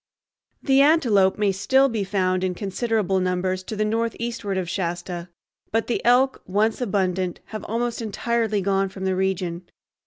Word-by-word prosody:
The 270 Hz, -1 st, +4 dB
antelope 240 Hz, -11 st, +4 dB
may 205 Hz, -2 st, +2 dB
still 265 Hz, +8 st, +3 dB
be 225 Hz, -5 st, -2 dB
found 185 Hz, -1 st, 0 dB
in 185 Hz, -1 st, -1 dB
considerable 200 Hz, 0 st, 0 dB
numbers 185 Hz, 0 st, -1 dB
to 215 Hz, -, -5 dB
the 215 Hz, 0 st, 0 dB
northeastward 230 Hz, -2 st, -2 dB
of 185 Hz, -2 st, -2 dB
Shasta, 175 Hz, -1 st, -4 dB, 0.4 s
but 225 Hz, +1 st, +1 dB
the 240 Hz, -, -2 dB
elk, 255 Hz, +3 st, +3 dB
once 215 Hz, +5 st, +1 dB
abundant, 185 Hz, -5 st, -1 dB
have 215 Hz, -, -5 dB
almost 235 Hz, +1 st, -2 dB
entirely 220 Hz, -1 st, -1 dB
gone 195 Hz, 0 st, +1 dB
from 190 Hz, 0 st, -6 dB
the 190 Hz, 0 st, +1 dB
region. 185 Hz, -2 st, -2 dB
200 Hz, 155 wpm, -23 LUFS, 185-230 Hz, 0.4 s, The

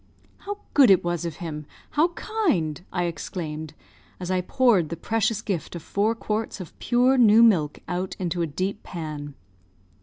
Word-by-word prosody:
"How 410 Hz, 0 st, -6 dB, 0.2 s
good 275 Hz, -5 st, +7 dB
it 190 Hz, -, +6 dB
was 175 Hz, 0 st, -2 dB
of 165 Hz, -3 st, -4 dB
him! 150 Hz, -4 st, -6 dB, 0.2 s
How 305 Hz, +3 st, +3 dB
kind!" 185 Hz, -, -1 dB
I 175 Hz, -1 st, -1 dB
exclaimed, 155 Hz, -2 st, -5 dB, 0.4 s
as 180 Hz, 0 st, -4 dB
I 185 Hz, -1 st, +1 dB
poured 200 Hz, -, +3 dB
the 170 Hz, -, -4 dB
precious 220 Hz, +3 st, 0 dB
gift 185 Hz, -5 st, -3 dB
of 170 Hz, -, -7 dB
four 210 Hz, +6 st, 0 dB
quarts 215 Hz, -1 st, -3 dB
of 185 Hz, -, -8 dB
pure 255 Hz, +2 st, +3 dB
new 225 Hz, -1 st, +7 dB
milk 165 Hz, -10 st, +3 dB
out 180 Hz, +2 st, -3 dB
into 175 Hz, -2 st, -2 dB
a 165 Hz, -, 0 dB
deep 185 Hz, +7 st, -3 dB
pan. 150 Hz, -4 st, -6 dB
185 Hz, 170 wpm, -25 LUFS, 165-225 Hz, 0.4 s, good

